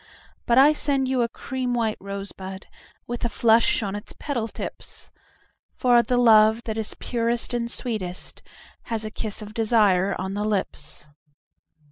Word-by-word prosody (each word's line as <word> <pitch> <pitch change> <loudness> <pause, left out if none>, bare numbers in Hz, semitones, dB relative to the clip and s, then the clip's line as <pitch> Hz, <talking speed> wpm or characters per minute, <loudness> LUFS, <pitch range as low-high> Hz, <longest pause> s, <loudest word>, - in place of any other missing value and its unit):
But 235 - +3
I 285 +3 +7
send 275 -3 +1
you 260 -1 +1
a 235 - +1
cream 255 0 -3
white 225 -2 -1
rosebud 195 -1 -7
5 - - -31 0.3
With 240 0 -5
a 235 - +1
flush 225 +1 +3
on 200 -1 -3
its 205 - -7
petal 245 -7 -2
tips; - - -7 0.6
For 245 -1 +4
the 250 +1 0
love 220 -1 +5
that 220 -2 -4
is 220 -1 -3
purest 235 0 -1
and 235 -1 -1
sweetest 210 -8 -3 0.4
Has 225 -2 -1
a 215 - -5
kiss 215 0 -2
of 210 0 -10
desire 210 -5 +3
on 190 +1 -3
the 205 +1 -2
lips. 195 -8 -3
225 Hz, 160 wpm, -24 LUFS, 205-240 Hz, 0.6 s, I